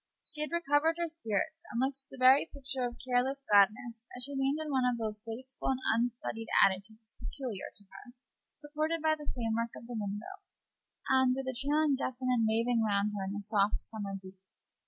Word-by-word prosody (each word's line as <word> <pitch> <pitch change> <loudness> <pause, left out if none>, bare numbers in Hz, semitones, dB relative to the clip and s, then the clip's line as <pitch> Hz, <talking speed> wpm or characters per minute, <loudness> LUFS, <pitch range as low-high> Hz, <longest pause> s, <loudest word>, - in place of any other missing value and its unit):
She 305 -1 -3
had 305 - -1
recovered 320 -1 +2
her 340 0 0
spirits, 315 - -2
and 235 - -3
looked 270 +1 -1
the - - -11
very 260 +2 +6
picture 270 -2 -1
of 240 - -9
careless 260 +2 +1
gladness 220 +3 +3
as 250 - -4
she 285 +2 -2
leaned 270 +1 +1
in 310 -1 -4
one 265 -2 +2
of 250 -1 +2
those 215 -2 -3
graceful 240 +4 -5
and 265 -1 +1
unstudied 230 -1 -2 0.2
attitudes 215 +4 -3
peculiar 245 -8 -5
to 205 - -11
her, 245 +5 -14 0.4
supported 310 +2 -2
by 315 0 +4
the 300 -1 -5
frame 230 -3 -2
work 230 0 -2
of - - -10
the 240 - -7
window, 210 - -5 0.7
and 260 -1 +4
with 270 0 -3
the 260 - -2
trailing 290 +3 +3
jessamine 255 -3 0
waving 230 +1 +2
round 210 -1 +1
her 200 - -2
in 195 - -4
the 205 0 -5
soft 205 0 +2
summer 205 -3 -5
breeze. 190 0 -17
245 Hz, 195 wpm, -32 LUFS, 220-275 Hz, 0.7 s, very